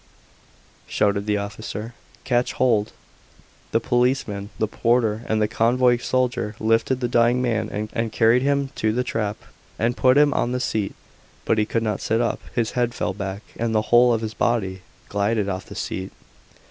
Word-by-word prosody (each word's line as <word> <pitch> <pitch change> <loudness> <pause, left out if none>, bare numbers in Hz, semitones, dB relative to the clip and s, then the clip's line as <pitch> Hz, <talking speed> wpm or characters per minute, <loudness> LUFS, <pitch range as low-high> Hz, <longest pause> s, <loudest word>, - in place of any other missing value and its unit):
shouted 100 0 0
the 105 -1 +2
officer. 105 +2 -5 0.3
"Catch 125 -1 +1
hold." 115 -5 +2 0.8
The - - +3
policeman, 120 -5 0
the 110 - 0
porter, 115 -1 +1
and 110 - +2
the 105 - +2
convoy 120 +3 +3
soldier 120 -3 -1
lifted 115 +4 +1
the 120 - +1
dying 120 +1 +3
man 110 -4 0 0.2
and 115 -1 -1
carried 115 +3 +4
him 140 0 +1
to 110 - +1
the 125 +2 0
trap, 110 -4 -2 0.4
and 115 +2 0
put 130 +1 +4
him 145 -1 +5
on 120 - 0
the 125 - -1
seat. 110 -5 -2 0.5
But 110 - +2
he 105 - +1
could 115 0 -1
not 105 -3 -2
sit 115 - +1
up; 120 -1 -1
his 115 -2 0
head 120 -1 -1
fell - - -1
back, 100 +1 -5 0.2
and 115 -1 0
the 110 +2 0
whole 120 +1 +7
of 115 -1 +1
his 110 -1 -4
body 95 -7 0 0.3
glided 105 +1 0
off 95 -1 -4
the - - -10
seat. 95 0 -4
115 Hz, 175 wpm, -23 LUFS, 105-120 Hz, 0.8 s, whole